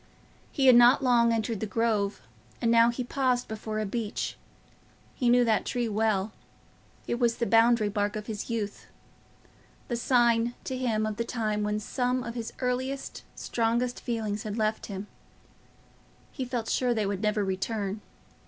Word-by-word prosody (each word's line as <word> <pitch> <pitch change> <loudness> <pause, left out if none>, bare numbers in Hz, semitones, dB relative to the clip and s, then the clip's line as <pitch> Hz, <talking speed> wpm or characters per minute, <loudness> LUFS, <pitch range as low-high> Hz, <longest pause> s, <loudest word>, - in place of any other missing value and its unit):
He 275 - 0
had 255 -2 +8
not 245 +3 +6
long 235 -2 +4
entered 225 -1 -1
the 220 - -3
Grove, 215 -2 0 0.4
and 230 -2 +1
now 230 0 +6
he 240 +1 -2
paused 250 -1 0
before 215 0 -4
a 215 - -1
beech. 215 +1 -3 0.8
He 245 - 0
knew 245 0 +5
that 220 -2 +2
tree 245 -1 -1
well; 215 -1 0 0.7
it 240 - -2
was 235 -2 +2
the 235 - -1
boundary 225 -2 +4
mark 205 +1 0
of 210 -1 -5
his 215 0 -5
youth—the 225 +2 -8
sign, 240 -1 +2
to 260 - -4
him, 230 -4 0
of 215 -1 -3
the 235 - 0
time 215 -3 -2
when 210 0 -1
some 250 +3 -1
of 235 - -5
his 230 -2 -5
earliest, 260 +2 -2
strongest 235 +2 -1
feelings 215 -3 -2
had 215 0 -5
left 215 0 -1
him. 195 -1 -6 1.3
He 265 - -4
felt 240 -3 -3
sure 245 -2 +1
they 215 -2 0
would 200 -1 -2
never 210 -1 +1
return. 195 +2 -2
230 Hz, 160 wpm, -28 LUFS, 215-245 Hz, 1.3 s, had